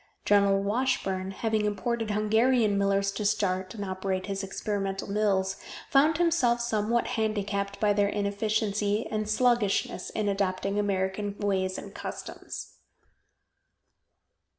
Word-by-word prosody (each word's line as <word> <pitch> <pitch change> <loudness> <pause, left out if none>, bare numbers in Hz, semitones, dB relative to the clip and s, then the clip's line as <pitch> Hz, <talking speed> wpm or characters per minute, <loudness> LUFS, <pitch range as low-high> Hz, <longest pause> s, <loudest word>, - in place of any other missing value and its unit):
General 200 -1 +4
Washburn, 200 -4 0
having 215 +2 -1
imported 225 +2 -2
Hungarian 220 +1 +3
millers 200 0 +2
to 200 +2 -4
start 190 -1 0
and 205 -2 -4
operate 190 0 -2
his 195 0 -3
experimental 195 0 -3
mills, 195 -2 +1 0.3
found 295 +3 +5
himself 325 -9 +3
somewhat 235 0 0
handicapped 200 -2 -1
by 210 -1 +3
their 200 0 +2
inefficiency 210 +1 0
and 215 -1 -2
sluggishness 225 -5 +1
in 215 -1 -2
adopting 195 0 0
American 200 0 -1
ways 190 -2 0
and - - -8
customs. - - -7
205 Hz, 115 wpm, -28 LUFS, 195-220 Hz, 0.3 s, found